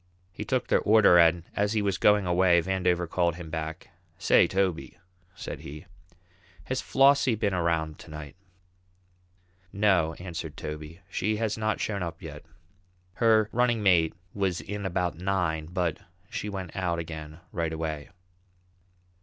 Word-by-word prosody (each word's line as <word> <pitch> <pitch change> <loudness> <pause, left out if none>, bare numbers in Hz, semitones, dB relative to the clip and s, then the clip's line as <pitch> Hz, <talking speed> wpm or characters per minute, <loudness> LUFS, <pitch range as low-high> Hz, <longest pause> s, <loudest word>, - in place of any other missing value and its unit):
He - - -6
took - - 0
their - - +3
order, 105 -5 +6
and 85 0 +4
as 105 +1 +1
he 110 - +1
was 100 -3 0
going 105 -1 +4
away, 90 0 +4
Vandover 90 -1 0
called 85 -1 +1
him 85 -2 -9
back: 80 -1 -5 0.3
"Say, - - +4
Toby," 95 -3 -1 0.4
said - - -6
he, 75 +2 -9 0.8
"has 130 0 -2
Flossie 135 -2 +4
been 105 -2 0
around 85 -3 -1
to - - -12
night?" 75 -2 -8 1.4
"No," 95 -6 +2
answered 85 -4 -7
Toby, 75 +3 -7
"she 100 +2 -1
hasn't 110 -1 -1
shown 100 -3 -2
up 85 -1 -4
yet. 75 -5 -9 0.7
Her 110 -1 +4
running 120 -2 +1
mate 85 -4 +4 0.2
was 95 -4 -1
in 105 -1 -4
about 90 -2 -2
nine, 90 -5 -1
but 90 -2 -1 0.3
she 105 - -4
went 95 -4 -6
out 90 -3 -1
again 80 -1 -7
right 85 -2 -2
away." 80 -2 -4
90 Hz, 145 wpm, -27 LUFS, 80-100 Hz, 1.4 s, order